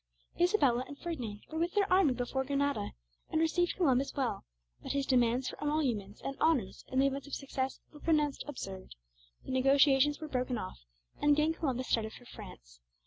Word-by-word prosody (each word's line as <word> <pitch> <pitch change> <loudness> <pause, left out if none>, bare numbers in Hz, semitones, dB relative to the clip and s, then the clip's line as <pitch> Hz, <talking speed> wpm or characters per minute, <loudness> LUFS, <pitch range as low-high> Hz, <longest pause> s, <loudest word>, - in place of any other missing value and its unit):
Isabella 290 - +3
and 285 - -9
Ferdinand 245 -13 -5
were 320 - -3
with 340 +3 -1
their 410 -1 +4
army 355 -9 +4
before 250 +2 -1
Granada, 280 -5 -1 0.4
and 315 - +1
received 345 +2 +2
Columbus 275 -7 +2
well; 255 -7 -1 0.4
but - - -4
his 280 -1 0
demands 250 -1 +2
for - - -7
emoluments 250 -10 -1
and 275 - -4
honors 275 -12 +1
in 260 - -4
the 270 - +5
event 275 +1 -1
of 285 - -4
success 265 -1 -3
were 295 - -12
pronounced 300 -3 +1
absurd; 195 - -7 0.5
the - - -5
negotiations 270 +2 +4
were 310 - -5
broken 255 -3 -1
off, 60 - -6 0.4
and 295 - +3
again 305 +2 +2
Columbus 260 -6 -2
started 220 -1 0
for 245 - -13
France. - - -12
275 Hz, 180 wpm, -32 LUFS, 245-300 Hz, 0.5 s, the